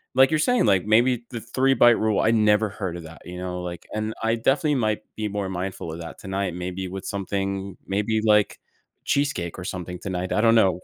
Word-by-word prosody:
like 130 Hz, +1 st, +6 dB
you're 155 Hz, -, +2 dB
saying, 250 Hz, +10 st, +3 dB
like, 95 Hz, -3 st, +3 dB
maybe 120 Hz, +3 st, +3 dB
the 120 Hz, -, -5 dB
3-bite 120 Hz, 0 st, +4 dB
rule 110 Hz, -2 st, +1 dB
I 110 Hz, -, +3 dB
never 105 Hz, -1 st, +3 dB
heard 95 Hz, -4 st, -4 dB
of 85 Hz, -, -9 dB
that, 80 Hz, +1 st, -12 dB
you 90 Hz, 0 st, -8 dB
know, 90 Hz, 0 st, -4 dB
like, 90 Hz, -1 st, -6 dB
and 110 Hz, +1 st, -2 dB
I 115 Hz, +1 st, +2 dB
definitely 145 Hz, +6 st, +2 dB
might 110 Hz, -4 st, 0 dB
be 110 Hz, -1 st, -2 dB
more 100 Hz, -1 st, -3 dB
mindful 90 Hz, -3 st, -4 dB
of 85 Hz, -, -7 dB
that 85 Hz, -, -8 dB
tonight, 95 Hz, -2 st, -3 dB
maybe 90 Hz, +1 st, -4 dB
with 95 Hz, +1 st, -7 dB
something 100 Hz, -1 st, -3 dB
maybe 105 Hz, +3 st, 0 dB
like 105 Hz, -1 st, +3 dB, 0.5 s
cheesecake 140 Hz, -, 0 dB
or 90 Hz, -, -6 dB
something 90 Hz, -1 st, -5 dB
tonight. 95 Hz, -1 st, -3 dB
I -, -, +2 dB
don't 115 Hz, 0 st, +5 dB
know. 95 Hz, -5 st, +4 dB
100 Hz, 210 wpm, -24 LUFS, 90-115 Hz, 0.5 s, like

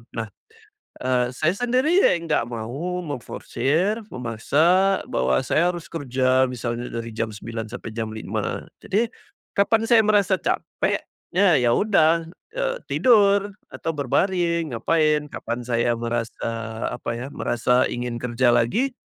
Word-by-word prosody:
Nah, 115 Hz, -1 st, -3 dB, 0.8 s
eee, 125 Hz, -1 st, +1 dB
saya 155 Hz, +5 st, +2 dB
sendiri 255 Hz, -, +2 dB, 0.3 s
nggak 150 Hz, -7 st, 0 dB
mau 135 Hz, +11 st, -4 dB
memforsir, 155 Hz, -, -1 dB
memaksa 155 Hz, -, +2 dB
bahwa 65 Hz, 0 st, +1 dB
saya 170 Hz, +3 st, +2 dB
harus 170 Hz, -, -10 dB
kerja 130 Hz, -3 st, +2 dB
misalnya 120 Hz, -1 st, -4 dB
dari 115 Hz, 0 st, -5 dB
jam 115 Hz, +1 st, -2 dB
9.00 110 Hz, +1 st, -6 dB
sampai 115 Hz, 0 st, -7 dB
jam 110 Hz, 0 st, -3 dB
5.00. 110 Hz, -, -3 dB, 0.2 s
Jadi 225 Hz, +4 st, 0 dB, 0.4 s
kapan 220 Hz, +3 st, +2 dB
saya 230 Hz, 0 st, +5 dB
merasa 200 Hz, -3 st, +3 dB
capek, -, -, -1 dB, 0.3 s
ya 185 Hz, -4 st, +5 dB
ya 120 Hz, -2 st, +3 dB
udah, 165 Hz, -5 st, +3 dB, 0.3 s
eee, -, -, -1 dB
tidur 205 Hz, -4 st, +4 dB, 0.2 s
atau 165 Hz, -, -3 dB
berbaring, 170 Hz, +2 st, 0 dB
ngapain. 150 Hz, +4 st, +2 dB
Kapan 120 Hz, +2 st, -4 dB
saya 120 Hz, -1 st, +1 dB
merasa 115 Hz, 0 st, -3 dB, 0.5 s
apa 120 Hz, -, -5 dB
ya, 125 Hz, -, -5 dB
merasa 125 Hz, +1 st, +2 dB
ingin 120 Hz, -1 st, -3 dB
kerja 125 Hz, +1 st, +1 dB
lagi, 225 Hz, -, +1 dB
145 Hz, 130 wpm, -23 LUFS, 120-190 Hz, 0.8 s, saya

